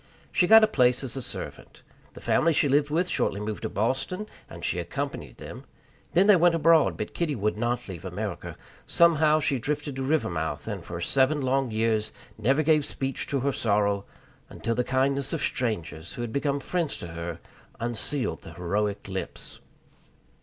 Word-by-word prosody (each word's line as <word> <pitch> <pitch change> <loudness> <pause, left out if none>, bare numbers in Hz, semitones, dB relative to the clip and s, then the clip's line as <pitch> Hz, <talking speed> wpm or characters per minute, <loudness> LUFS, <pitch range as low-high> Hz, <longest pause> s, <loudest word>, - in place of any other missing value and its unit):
She 180 - +3
got 220 +3 +9
a - - +6
place 125 - +3
as 125 -4 -4
a 135 - -3
servant. - - -7 0.3
The - - -11
family 165 +1 +3
she 145 - +3
lived 145 +2 +3
with 170 +4 +1
shortly 100 - 0
moved 105 0 -4
to - - -3
Boston, 135 - -1 0.2
and - - -7
she - - 0
accompanied - - -5
them; - - -9 0.5
then 185 +3 +5
they 210 -1 +7
went 175 -1 +4
abroad, 165 0 +4
but - - -4
Kitty 160 -4 -1
would 105 -1 0
not 120 +2 -1
leave 90 -4 -8
America. 100 +3 -5 0.3
Somehow 155 -2 +4
she 140 -3 0
drifted 145 +2 -3
to - - -2
Rivermouth, 85 - -1
and 100 -5 -4
for 85 0 -6
seven 135 - +2
long 135 0 +1
years 110 -1 0 0.2
never 135 +8 +2
gave 155 -1 +4
speech 135 -2 -3
to 140 -2 -1
her 140 +2 +1
sorrow, 100 -3 +1 0.4
until 115 - -2
the 125 +2 +1
kindness 135 +1 0
of - - -2
strangers, 85 - -2
who 120 - -4
had 115 - -5
become 140 0 0
friends 170 +2 -1
to 85 - -7
her, 85 0 -5 0.4
unsealed 120 +3 -2
the 80 - -11
heroic 100 +4 -1
lips. 95 -1 -6
130 Hz, 180 wpm, -27 LUFS, 105-150 Hz, 0.5 s, got